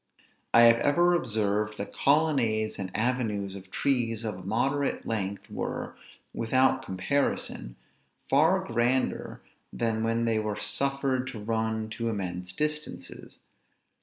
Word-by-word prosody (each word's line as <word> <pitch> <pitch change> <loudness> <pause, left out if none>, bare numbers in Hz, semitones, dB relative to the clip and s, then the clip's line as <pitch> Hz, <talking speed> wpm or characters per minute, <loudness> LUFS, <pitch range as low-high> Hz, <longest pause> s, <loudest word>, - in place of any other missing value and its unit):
I 115 - +7
have 115 0 +8
ever 175 +7 +3
observed, 105 -7 0
that 100 - -5
colonnades 135 -8 +2
and 95 -1 -3
avenues 110 -5 -1
of 95 -1 -10
trees 115 -1 0
of 110 -2 -2
a - - -9
moderate 135 +9 -1
length 100 -3 -2
were, - - -4 0.4
without 130 +3 +2
comparison, 95 - -1 0.5
far 165 +7 +4
grander 120 +3 0 0.3
than 115 -1 -1
when 115 +1 +1
they 115 -1 +2
were 105 -1 -3
suffered 135 0 0
to 125 -4 -6
run 110 0 -1
to 115 +1 -2
immense 90 -4 -4
distances. 150 +7 -4
115 Hz, 125 wpm, -28 LUFS, 105-135 Hz, 0.5 s, have